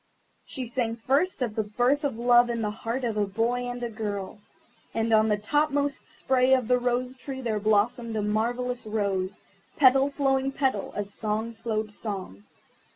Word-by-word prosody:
She 260 -3 -4
sang 235 -1 -1
first 275 +7 +1
of 230 -4 -2
the 220 - 0
birth 245 +8 +1
of 275 -6 -1
love 240 0 +5
in 230 -1 -1
the 210 - -1
heart 230 +4 -4
of 225 -3 -1
a 205 -1 +1
boy 240 +5 -1
and 245 0 -5
a 240 - -2
girl. 205 -2 -4 0.6
And 225 0 +1
on 220 0 +5
the 210 -1 +2
top 295 +9 +1
most 285 0 -1
spray 260 0 +2
of 255 -4 -1
the 250 0 +3
Rose 250 +1 -1
tree 265 +1 -7
there 225 -4 -1
blossomed 220 +3 +1
a 215 - 0
marvellous 240 +4 -1
rose, 200 -3 -1 0.4
petal 270 0 +5
following 270 -1 +1
petal, 265 -8 0
as 205 -1 -4
song 220 +1 -2
followed 220 -1 -3
song. 190 - -6
235 Hz, 180 wpm, -27 LUFS, 215-255 Hz, 0.6 s, love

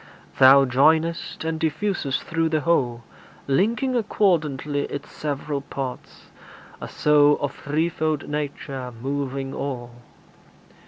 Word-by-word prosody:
Thou 135 +1 +8
joinest 160 +6 +1
and 160 0 -2
diffusest 160 -3 -1
through 165 -1 0
the 155 -1 0
whole, 125 -8 +1 0.4
Linking 230 - +1
accordantly 155 - 0
its 145 0 -7
several 145 -1 -3
parts, 135 -2 -7 0.5
A - - -5
soul 150 0 +4
of 145 - -2
threefold 155 0 -1
nature, 140 -3 -4
moving 135 0 -3
all. 125 -4 -5
145 Hz, 105 wpm, -23 LUFS, 135-160 Hz, 0.5 s, Thou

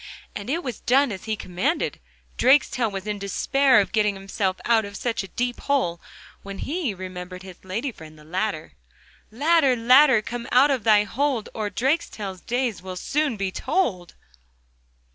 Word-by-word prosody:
And 200 +3 -6
it 335 +5 -1
was 245 -5 -5
done 270 +1 +3
as 190 - -7
he 220 -1 -1
commanded. 185 - -2 0.4
Drakestail 255 -3 +3
was 195 0 -5
in 210 -1 -3
despair 260 +6 +3
of 200 - 0
getting 210 -2 +1
himself 195 -1 -2
out 230 -2 +3
of 200 0 -8
such 240 -2 -2
a 195 - -8
deep 245 +4 -3
hole, 215 -13 0 0.4
when 200 0 -8
he 300 - -2
remembered 180 0 -8
his 185 -2 -12
lady 220 +9 -3
friend, 155 -6 -13
the 150 - -16
Ladder. 180 0 -3 0.6
'Ladder, 285 +2 +3
Ladder, 250 0 +5
come 240 +1 -6
out 270 +4 +5
of 260 -5 -1
thy 210 -2 +6
hold, 250 +1 -1
Or 215 -2 -3
Drakestail's 230 - -2
days 245 -4 -2
will 185 0 -7
soon 290 +3 -1
be 195 -1 -2
told. 185 - -1
220 Hz, 165 wpm, -24 LUFS, 190-260 Hz, 0.6 s, thy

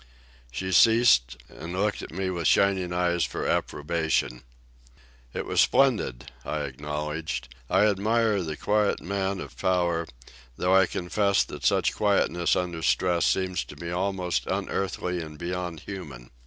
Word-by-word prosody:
She 95 +10 -4
ceased, 95 - +5
and 80 +5 -8
looked 100 +3 0
at - - -8
me 95 +2 -2
with 85 -3 -1
shining 95 -2 +3
eyes 90 -1 +1
for 65 - -3
approbation. 75 -5 -1 0.9
"It - - -4
was - - +2
splendid," 115 - +2
I - - -3
acknowledged. 75 -1 -4 0.2
"I 95 +3 +4
admire 105 +1 +2
the 80 -3 -4
quiet 105 -1 +1
man 95 +1 -2
of - - -8
power, 85 -3 0 0.5
though 90 +1 +1
I 95 -1 +5
confess 100 +2 +1
that - - -9
such - - +2
quietness 90 -4 +2
under 85 -3 -2
stress 85 +1 +2
seems 95 -2 0
to - - -11
me 85 0 -6
almost 90 0 -1
unearthly 90 -2 -2
and 80 -1 -9
beyond 85 -1 -4
human. 75 -12 -9
90 Hz, 140 wpm, -26 LUFS, 80-95 Hz, 0.9 s, ceased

